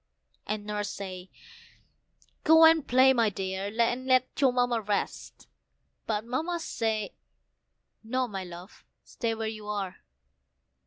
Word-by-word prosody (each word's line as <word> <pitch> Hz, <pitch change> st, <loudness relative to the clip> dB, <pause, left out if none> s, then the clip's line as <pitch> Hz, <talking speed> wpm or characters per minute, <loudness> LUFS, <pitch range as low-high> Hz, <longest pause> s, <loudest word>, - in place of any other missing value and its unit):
And 210 Hz, 0 st, -3 dB
Nurse 210 Hz, -1 st, -3 dB
said, 185 Hz, -2 st, -7 dB, 1.2 s
"Go 320 Hz, +1 st, +7 dB
and 320 Hz, -2 st, +5 dB
play, 260 Hz, +2 st, +6 dB
my 230 Hz, -4 st, +3 dB
dear, 190 Hz, +1 st, -4 dB
and 245 Hz, +2 st, +1 dB
let 255 Hz, -1 st, +4 dB
your 265 Hz, -2 st, +5 dB
Mamma 245 Hz, -2 st, +1 dB
rest;" 205 Hz, -1 st, -4 dB, 0.6 s
but 215 Hz, 0 st, -1 dB
Mamma 320 Hz, +9 st, -2 dB
said, 220 Hz, -9 st, -2 dB, 0.9 s
"No, 255 Hz, +3 st, -1 dB
my 195 Hz, -4 st, -5 dB
love, 180 Hz, +2 st, -11 dB, 0.2 s
stay 230 Hz, -2 st, -3 dB
where 220 Hz, 0 st, -3 dB
you 215 Hz, -1 st, -7 dB
are. 200 Hz, -3 st, -3 dB
225 Hz, 125 wpm, -28 LUFS, 205-255 Hz, 1.2 s, Go